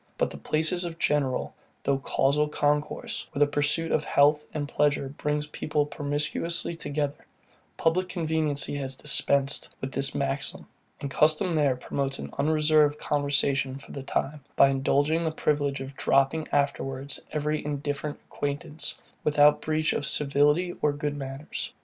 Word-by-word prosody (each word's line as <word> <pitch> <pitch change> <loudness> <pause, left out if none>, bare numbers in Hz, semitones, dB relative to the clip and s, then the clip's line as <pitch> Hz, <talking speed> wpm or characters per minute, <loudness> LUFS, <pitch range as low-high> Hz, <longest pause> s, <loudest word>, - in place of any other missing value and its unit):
But - - 0
in - - -9
places 160 +3 +1
of 170 -1 -5
general, 145 -5 0 0.3
though 140 0 +1
casual 140 +3 +1
concourse, 150 0 -1
where 140 - -5
the 145 - +7
pursuit 145 +3 0
of 150 - +2
health 150 +1 +3
and 145 -2 -3
pleasure 145 -2 +1
brings 150 +1 -2
people 150 0 -1
promiscuously 150 +4 -2
together, 145 -2 -3 0.5
public 180 +3 +1
conveniency 160 -5 -1
has 135 -1 -4
dispensed 140 -1 +2
with 130 - -4
this 135 0 +2
maxim; 135 0 -2 0.4
and 140 - -4
custom 155 +4 +3
there 145 -4 +3
promotes 135 +2 -2
an - - -7
unreserved 150 0 +3
conversation 140 -2 0
for 140 - -13
the 140 - -6
time, 135 +2 -2
by 140 - +6
indulging 145 +4 +2
the 160 - 0
privilege 145 -3 0
of 135 +1 -7
dropping 135 +5 +2
afterwards 140 -1 -1
every 150 0 -1
indifferent 145 0 -3
acquaintance, 145 +2 -4 0.3
without 150 0 +5
breach 155 0 0
of 145 - -1
civility 150 +4 +2
or 150 - +2
good 145 0 -3
manners. 135 +1 -6
145 Hz, 145 wpm, -27 LUFS, 140-150 Hz, 0.5 s, the